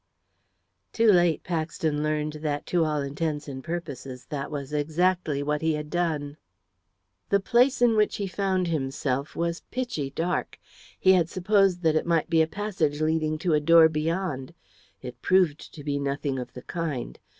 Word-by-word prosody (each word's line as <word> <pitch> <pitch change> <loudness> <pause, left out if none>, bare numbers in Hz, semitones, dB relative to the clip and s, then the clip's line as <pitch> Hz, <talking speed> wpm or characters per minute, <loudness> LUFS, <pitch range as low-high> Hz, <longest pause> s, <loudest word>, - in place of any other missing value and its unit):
Too 225 -1 +5
late 175 -4 +3
Paxton 160 -3 -2
learned 155 0 -1
that, 145 -2 -2
to 175 -2 +4
all 150 -2 0
intents 145 +1 -3
and 130 -2 -7
purposes, 140 -7 -6
that 140 -2 -3
was 145 -1 -6
exactly 155 0 0
what 150 +1 -1
he 160 0 +1
had 150 0 -5
done. 155 -4 -1 0.9
The 200 - +4
place 245 +5 +3
in 235 -2 +5
which 210 -1 +2
he 200 - -2
found 190 -1 0
himself 140 -2 -2
was 170 0 -2
pitchy 240 - -3
dark. 165 +6 -2 0.4
He 190 - +5
had 175 -3 +3
supposed 190 -1 +2
that 160 -1 +3
it 155 - 0
might 170 0 +1
be 165 -1 +5
a 160 - +3
passage 175 -6 -2
leading 155 0 0
to 170 - +3
a 150 - +4
door 165 +1 +6
beyond. 160 -2 -2 0.5
It 125 -1 -8
proved 180 -5 +2
to 150 - -9
be 145 -1 -1
nothing 140 -1 -2
of 125 - -7
the 125 - -9
kind. 160 -8 -4
160 Hz, 170 wpm, -26 LUFS, 145-180 Hz, 0.9 s, door